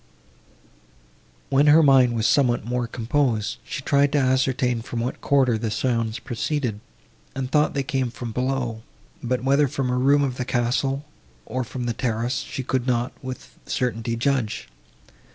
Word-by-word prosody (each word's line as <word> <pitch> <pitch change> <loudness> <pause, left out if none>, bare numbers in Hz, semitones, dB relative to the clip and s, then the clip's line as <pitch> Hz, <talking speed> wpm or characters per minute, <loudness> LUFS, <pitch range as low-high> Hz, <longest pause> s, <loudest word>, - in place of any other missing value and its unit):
When 140 +2 +4
her 155 +2 +7
mind 130 -4 +5
was 110 -1 0
somewhat 120 -6 +3
more 120 0 -1
composed, 115 -3 0
she 140 - -6
tried 140 0 +3
to - - +3
ascertain 130 -2 +1
from 120 0 -5
what 120 +2 -3
quarter 130 -5 +2
the 110 0 -2
sounds 115 0 -1
proceeded, 120 -2 -2 0.6
and 130 -1 -3
thought 150 -1 +2
they 140 - 0
came 130 -2 -1
from 120 0 -6
below; 125 -2 -2 0.4
but 125 +1 -1
whether 140 +2 +3
from 135 -2 -2
a 125 - 0
room 140 +2 +4
of 130 -2 -2
the - - -1
castle, 130 +3 0 0.4
or 130 0 -2
from 125 +1 -6
the 120 - -1
terrace, 120 +1 -1
she 135 - -5
could 130 0 -1
not 120 0 +1
with 130 -1 -8
certainty 115 -2 -1
judge. 120 -2 -1
125 Hz, 160 wpm, -23 LUFS, 120-135 Hz, 0.6 s, her